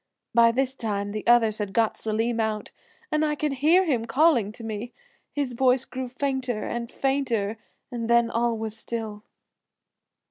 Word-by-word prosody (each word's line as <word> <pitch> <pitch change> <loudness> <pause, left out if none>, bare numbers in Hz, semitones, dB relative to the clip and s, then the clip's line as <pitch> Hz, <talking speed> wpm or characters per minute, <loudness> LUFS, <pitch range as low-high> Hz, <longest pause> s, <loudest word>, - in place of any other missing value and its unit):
By 230 0 +6
this 260 +2 0
time 205 -5 -3
the 215 0 -4
others 225 -3 +4
had 205 -2 -3
got 225 0 +2
Selim 225 +2 -1
out, 215 -1 -2 0.4
and 305 0 +2
I 300 -1 +1
could 295 -1 -1
hear 350 +6 +5
him 250 -8 0
calling 255 -5 +3
to 230 - -11
me. 225 +2 -5 0.4
His 280 -4 -2
voice 255 +1 +3
grew 255 -1 -5
fainter 260 -3 -2
and 235 0 -4
fainter 235 -6 -1 0.3
and 235 -2 -4
then 235 0 +4
all 235 0 +1
was 220 -1 -3
still." 220 -2 -5
235 Hz, 165 wpm, -25 LUFS, 220-265 Hz, 0.4 s, By